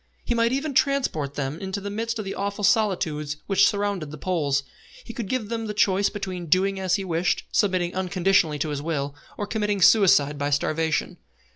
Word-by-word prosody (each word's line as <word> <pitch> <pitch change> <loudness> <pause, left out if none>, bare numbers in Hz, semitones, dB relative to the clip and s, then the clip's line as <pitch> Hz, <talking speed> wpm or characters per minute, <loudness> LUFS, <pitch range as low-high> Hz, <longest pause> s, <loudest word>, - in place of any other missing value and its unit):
He - - 0
might 230 0 +2
even 275 +3 -1
transport 255 - 0
them 145 +2 -3
into 190 0 -4
the 200 0 -6
midst 230 +2 -3
of 215 - -4
the 195 - -4
awful 200 +1 -3
solitudes 175 - +1
which 195 0 +4
surround 205 -2 -1
the 155 0 -7
Poles. 145 -5 0 0.4
He 230 - -9
could 230 -4 -5
give 245 -5 -2
them 225 -1 -3
the 210 - -4
choice 200 -1 +3
between 185 -4 -5
doing 190 +4 +2
as 185 -1 +1
he 195 -1 -3
wished, 175 +1 0
submitting 185 -4 +1
unconditionally 185 -4 +1
to 150 +2 -2
his 145 -1 -3
will, 145 -3 -2 0.2
or 205 - -2
committing 210 -1 -1
suicide 170 -8 +5
by 145 0 0
starvation. 155 +2 0
190 Hz, 190 wpm, -24 LUFS, 155-205 Hz, 0.4 s, suicide